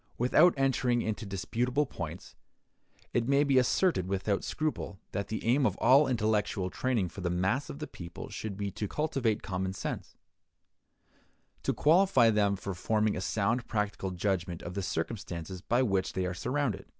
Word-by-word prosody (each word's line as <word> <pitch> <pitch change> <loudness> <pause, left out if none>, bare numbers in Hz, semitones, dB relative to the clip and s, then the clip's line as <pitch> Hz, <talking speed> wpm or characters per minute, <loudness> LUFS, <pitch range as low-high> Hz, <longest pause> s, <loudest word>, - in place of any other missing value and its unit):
Without 155 +8 +5
entering 125 -3 +2
into 110 0 -3
disputable 120 +8 0
points, 85 - -7 0.8
it 120 -1 +1
may 140 +1 +4
be 140 -2 +4
asserted 125 - +2
without 100 +1 -1
scruple 155 -10 -3
that 100 +1 -3
the 110 - -4
aim 130 +5 +3
of - - +2
all 135 +4 +5
intellectual 105 -5 0
training 120 -7 0
for 95 - -9
the 90 - -1
mass 95 +10 0
of - - -6
the 150 - -4
people 85 - -9
should 105 -3 -6
be 100 -1 -3
to 105 - -4
cultivate 135 -6 -1
common 95 0 -2
sense; 95 - -5 1.5
to - - 0
qualify 155 -7 +4
them 100 -2 +2
for 100 0 -5
forming 105 +3 +1
a - - -3
sound 115 +5 0
practical 105 -3 -2
judgment 90 -2 -2
of 85 - -6
the 100 - -2
circumstances 90 -1 -4
by 120 +6 +2
which 95 -5 0
they 95 -1 -1
are 90 - -2
surrounded. 125 +3 -2
105 Hz, 165 wpm, -30 LUFS, 95-130 Hz, 1.5 s, Without